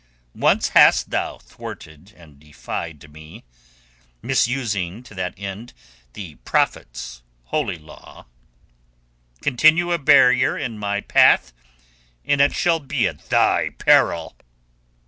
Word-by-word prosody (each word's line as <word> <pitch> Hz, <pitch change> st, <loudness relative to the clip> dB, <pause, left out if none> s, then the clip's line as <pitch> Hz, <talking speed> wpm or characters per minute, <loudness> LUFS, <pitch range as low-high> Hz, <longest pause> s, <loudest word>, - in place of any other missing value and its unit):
Once -, -, +1 dB
hast -, -, +4 dB
thou -, -, -3 dB
thwarted 80 Hz, +6 st, -12 dB
and 75 Hz, -5 st, -18 dB
defied 75 Hz, +1 st, -8 dB
me, 80 Hz, +1 st, -14 dB, 0.8 s
misusing 115 Hz, -6 st, -1 dB
to 125 Hz, -, -15 dB
that 90 Hz, -2 st, -5 dB
end 100 Hz, +5 st, -8 dB, 0.4 s
the 90 Hz, -7 st, -9 dB
Prophet's 60 Hz, 0 st, -3 dB, 0.2 s
Holy 65 Hz, -, -3 dB
Law. 80 Hz, 0 st, -16 dB, 1.2 s
Continue 155 Hz, +6 st, +3 dB
a 170 Hz, -, 0 dB
barrier 135 Hz, -3 st, +4 dB
in 115 Hz, -6 st, -5 dB
my 100 Hz, 0 st, -2 dB
path 60 Hz, -, +3 dB, 0.7 s
and 145 Hz, -1 st, +2 dB
it 140 Hz, -, +4 dB
shall 170 Hz, -2 st, +1 dB
be 140 Hz, -, -1 dB
at -, -, -10 dB
thy -, -, +2 dB
peril." 80 Hz, -1 st, +2 dB
100 Hz, 110 wpm, -21 LUFS, 80-135 Hz, 1.2 s, hast